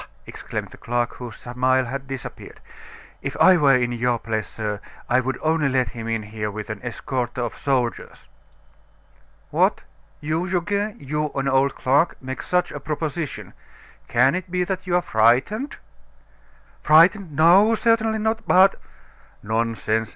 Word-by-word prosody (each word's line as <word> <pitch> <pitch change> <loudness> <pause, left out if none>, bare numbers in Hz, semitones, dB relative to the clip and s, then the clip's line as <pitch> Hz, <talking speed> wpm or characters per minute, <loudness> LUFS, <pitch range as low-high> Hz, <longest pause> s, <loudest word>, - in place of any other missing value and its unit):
exclaimed - - -6
the - - -14
clerk, 120 0 -2
whose 120 -3 -8
smile 130 +1 0
had 135 +3 -6
disappeared, 135 -2 -8 0.6
"If - - -5
I 185 - +7
were 145 -5 +5
in 120 -1 +1
your 120 0 0
place, 110 -2 -3
sir, 105 -2 -4 0.3
I 125 - +3
would 130 0 -2
only 160 -2 +2
let 130 -1 +1
him 115 -1 -7
in 115 -1 -1
here 105 0 -4
with 105 +1 -6
an 110 - -6
escort 120 0 -4
of 120 -2 -3
soldiers." 125 -4 -2 1.2
"What! - - +2 0.4
you 160 +4 -2
Goguet, 200 +4 -1
you, 150 +2 -2
an 135 0 -1
old 135 0 +2
clerk 140 +6 +1
make 130 0 -6
such 180 -1 0
a 145 - -6
proposition! 150 +1 -4 0.5
Can 125 +3 +3
it 185 0 -4
be 180 0 0
that 185 0 -4
you're 175 0 +2
frightened?" 125 - +2 1.1
"Frightened! 165 +3 +4
No, 190 +9 +6
certainly 225 -1 +2
not; 220 +1 -2
but 190 +2 +5 0.3
" - - -30
"Nonsense!" 110 0 -1
135 Hz, 150 wpm, -22 LUFS, 120-175 Hz, 1.2 s, I